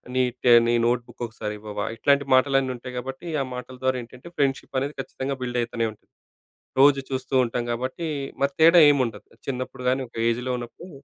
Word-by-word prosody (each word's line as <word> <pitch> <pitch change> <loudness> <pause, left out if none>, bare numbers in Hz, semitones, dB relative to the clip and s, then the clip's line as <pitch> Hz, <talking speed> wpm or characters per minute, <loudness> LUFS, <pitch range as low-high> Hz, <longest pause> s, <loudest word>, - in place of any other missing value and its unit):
నీ 130 - +4 0.2
ట - - -9 0.2
నీ - - +3
నోట్బుక్కొక్కసారివ్వవా? 110 -3 -3
ఇట్లాంటి 140 +4 +3
మాటలన్నీ 135 0 +3
ఉంటాయి 125 +1 -9
కాబట్టి, 135 +7 -6
ఆ - - +1
మాటల 125 +1 -8
ద్వారా 130 -1 +2
ఏంటంటే, 125 +5 -14
ఫ్రెండ్‌షిప్ 135 -1 0
అనేది 140 +2 -3
ఖచ్చితంగా 135 0 -4
బిల్డ్ 125 0 -2
అయితనే 115 -1 -1
ఉంటది. 105 - -21 0.7
రోజూ 140 0 +6
చూస్తుంటాం 130 -2 0
కాబట్టి, 130 +7 -3 0.3
మరి 140 0 +1
తేడా 165 +2 +8
ఏమి 140 -2 +3
ఉండదు. 115 - -9 0.2
చిన్నప్పుడు 125 -1 -4
గానీ, 130 +1 0
ఒక 115 - -18
ఏజ్‌లో 125 +2 -1
ఉన్నప్పుడు 120 +9 -9
130 Hz, 165 wpm, -24 LUFS, 120-135 Hz, 0.7 s, తేడా